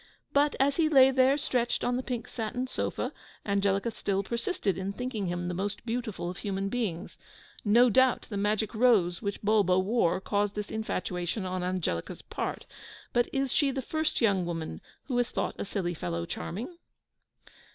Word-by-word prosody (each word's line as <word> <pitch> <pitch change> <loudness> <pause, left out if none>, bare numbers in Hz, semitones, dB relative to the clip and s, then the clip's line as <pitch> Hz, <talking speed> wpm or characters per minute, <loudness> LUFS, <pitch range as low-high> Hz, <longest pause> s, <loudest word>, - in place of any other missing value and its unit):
But 290 +1 +3
as 275 +1 +3
he 320 -2 +3
lay 265 -3 +7
there 265 +1 +4
stretched 245 -4 0
on 245 - +1
the 255 - 0
pink 245 -3 -4
satin 240 +2 -3
sofa, 255 - -3 0.3
Angelica 200 +2 +1
still 200 -2 -1
persisted 235 - -1
in 190 +2 -3
thinking 230 -4 -3
him 175 0 -2
the 180 - -2
most 195 +5 -3
beautiful 230 -6 -3
of 180 +1 -5
human 195 -1 -2
beings. 200 -7 -3 0.4
No 235 +4 +6
doubt 260 +2 +4
the 210 - -6
magic 210 +2 0
rose 215 -7 +3
which 200 -1 -4
Bulbo 205 -3 +4
wore 185 -2 +2
caused 205 +1 0
this 210 0 -4
infatuation 185 -2 -2
on 185 0 -2
Angelica's 180 - -2
part; - - -4 0.5
but 240 0 +2
is 270 -1 0
she 285 - +3
the 265 -1 -2
first 315 +3 -1
young 200 -5 +3
woman 165 -2 -4 0.2
who 260 - -3
has 245 -1 +2
thought - - -2
a - - -2
silly 190 -3 -2
fellow 85 - -3
charming? 225 - -5
210 Hz, 170 wpm, -29 LUFS, 185-245 Hz, 0.5 s, lay